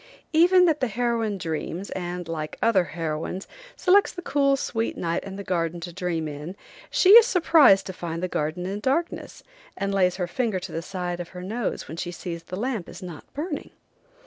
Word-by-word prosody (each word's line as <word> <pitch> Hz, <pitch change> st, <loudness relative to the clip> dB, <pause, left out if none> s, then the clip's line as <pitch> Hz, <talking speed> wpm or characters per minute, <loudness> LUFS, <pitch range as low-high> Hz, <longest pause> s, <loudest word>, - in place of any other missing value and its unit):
Even 360 Hz, +3 st, +6 dB
that 315 Hz, -4 st, +2 dB
heroine 230 Hz, -3 st, 0 dB
dreams, 170 Hz, +2 st, -4 dB
and, 175 Hz, -1 st, -4 dB
like 155 Hz, -2 st, -4 dB
other 200 Hz, -6 st, +3 dB
heroines, 165 Hz, +3 st, -4 dB, 0.3 s
selects 395 Hz, +2 st, +4 dB
the 355 Hz, -, -8 dB
cool, 275 Hz, -3 st, +2 dB
sweet 225 Hz, -3 st, -2 dB
night 170 Hz, -1 st, -1 dB
and 195 Hz, 0 st, -7 dB
the 200 Hz, -, -5 dB
garden 170 Hz, -2 st, -1 dB
to 175 Hz, +1 st, -7 dB
dream 170 Hz, -3 st, -2 dB
in. 150 Hz, +5 st, -7 dB, 0.3 s
She 370 Hz, -, +3 dB
is 465 Hz, +2 st, +10 dB
surprised 320 Hz, -, +5 dB
to 190 Hz, -, -5 dB
find 170 Hz, -1 st, -5 dB
the -, -, +1 dB
garden 155 Hz, +1 st, -2 dB
in 195 Hz, +2 st, -3 dB
darkness, 280 Hz, +10 st, -2 dB, 0.3 s
and 195 Hz, 0 st, -1 dB
lays 185 Hz, -2 st, +3 dB
her 180 Hz, -, -1 dB
finger 220 Hz, +1 st, -1 dB
to -, -, -7 dB
the 165 Hz, -, -3 dB
side 180 Hz, -1 st, -4 dB
of 175 Hz, -, -6 dB
her 180 Hz, -, -6 dB
nose 220 Hz, +4 st, -3 dB
when 160 Hz, -, -7 dB
she 175 Hz, -, -3 dB
sees 175 Hz, -1 st, -6 dB
the 180 Hz, -, -7 dB
lamp 225 Hz, -2 st, -3 dB
is -, -, -10 dB
not 175 Hz, -4 st, -9 dB
burning. 300 Hz, +1 st, -4 dB
190 Hz, 195 wpm, -25 LUFS, 175-245 Hz, 0.3 s, is